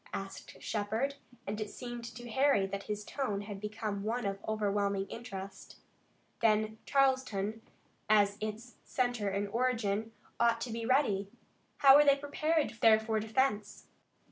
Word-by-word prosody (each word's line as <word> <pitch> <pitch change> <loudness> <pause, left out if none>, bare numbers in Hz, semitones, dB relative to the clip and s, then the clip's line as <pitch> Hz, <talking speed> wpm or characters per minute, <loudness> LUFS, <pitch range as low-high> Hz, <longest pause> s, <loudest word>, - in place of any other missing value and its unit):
asked 195 0 -7
Shepard, 220 +6 -1 0.3
and 210 +2 -3
it 210 - -3
seemed 240 0 -7
to 240 +1 -9
Harry 265 -4 +3
that 200 +1 -4
his 210 0 -3
tone 210 -8 -2
had 205 -1 -7
become 210 -1 -3
one 230 +3 -2
of 195 0 -3
overwhelming 200 -2 0
interest. 195 -5 -8 0.6
"Then 215 -1 +2
Charleston, 260 -6 +1 0.5
as 205 -1 +4
its 215 +3 -6
center 245 -5 -1
and 200 +1 -1
origin, 225 -2 0 0.3
ought 235 -1 +3
to 240 - -3
be 230 0 -3
ready. 210 -8 +2 0.5
How 275 -1 +8
are 295 - +7
they 280 -1 +5
prepared 295 -2 -1
there 220 -1 +7
for 220 0 -1
defense?" 215 -1 -1
220 Hz, 145 wpm, -32 LUFS, 205-245 Hz, 0.6 s, How